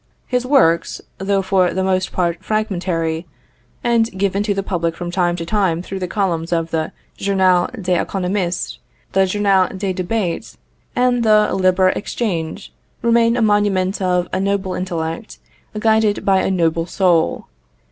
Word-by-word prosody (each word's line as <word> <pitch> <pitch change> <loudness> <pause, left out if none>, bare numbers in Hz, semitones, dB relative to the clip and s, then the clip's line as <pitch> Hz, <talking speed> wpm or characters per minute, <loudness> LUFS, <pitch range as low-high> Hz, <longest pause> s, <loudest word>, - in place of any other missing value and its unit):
His 250 0 -1
works, 170 - +3 0.2
though 195 0 0
for 190 -2 +2
the 190 - 0
most 185 0 0
part 175 0 -1
fragmentary, 175 -6 -1 0.6
and 235 -1 +2
given 200 +1 0
to 205 0 0
the 195 - -1
public 170 -4 -1
from 175 -1 -5
time 175 -1 +1
to 170 -1 -5
time 180 -3 0
through 195 +1 -6
the 180 - -3
columns 175 -4 -1
of 165 -1 -1
the 160 -1 -1 0.3
Journal 185 -2 +2
des 180 -2 +1
Economistes, 185 -1 -2 0.3
the 195 0 +3
Journal 195 -1 +2
des 190 -1 -2
Debats, 185 -1 -3 0.4
and 245 -1 +2
the 215 -2 +4
Libre 185 0 +3
Echange, 195 -5 -3 0.3
remain 235 0 +3
a 240 - +2
monument 205 -3 +1
of 180 -1 +1
a - - +1
noble 195 -1 -1
intellect 170 +2 -4 0.4
guided 220 -1 +2
by 190 -1 +4
a - - 0
noble 165 -2 +1
soul. 175 -5 +1
190 Hz, 150 wpm, -19 LUFS, 175-205 Hz, 0.6 s, the